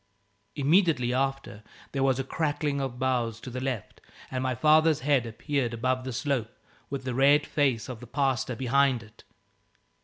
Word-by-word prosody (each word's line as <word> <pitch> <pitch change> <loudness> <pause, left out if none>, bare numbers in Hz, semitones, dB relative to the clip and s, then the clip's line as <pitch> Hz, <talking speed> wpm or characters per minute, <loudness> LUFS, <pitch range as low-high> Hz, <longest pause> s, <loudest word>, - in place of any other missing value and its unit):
Immediately 145 -4 +3
after, 135 -4 -2 0.3
there 135 - -2
was 135 -1 +3
a 135 - -1
crackling 145 0 -1
of 130 -2 -4
boughs 125 -4 -1
to 130 - -8
the 125 +1 -4
left 130 -6 -4 0.3
and 130 -1 -2
my 130 -1 -1
father's 155 +2 +4
head 135 -4 +2
appeared 120 +1 -2
above 130 +2 -1
the 130 - -3
slope, 130 -3 -1 0.4
with 140 -1 -4
the 130 -1 -3
red 140 +3 +4
face 135 -7 0
of 125 -3 -7
the 125 - -11
pastor 130 -2 0
behind 130 0 +2
it. 110 +1 -18
130 Hz, 165 wpm, -27 LUFS, 125-140 Hz, 0.4 s, father's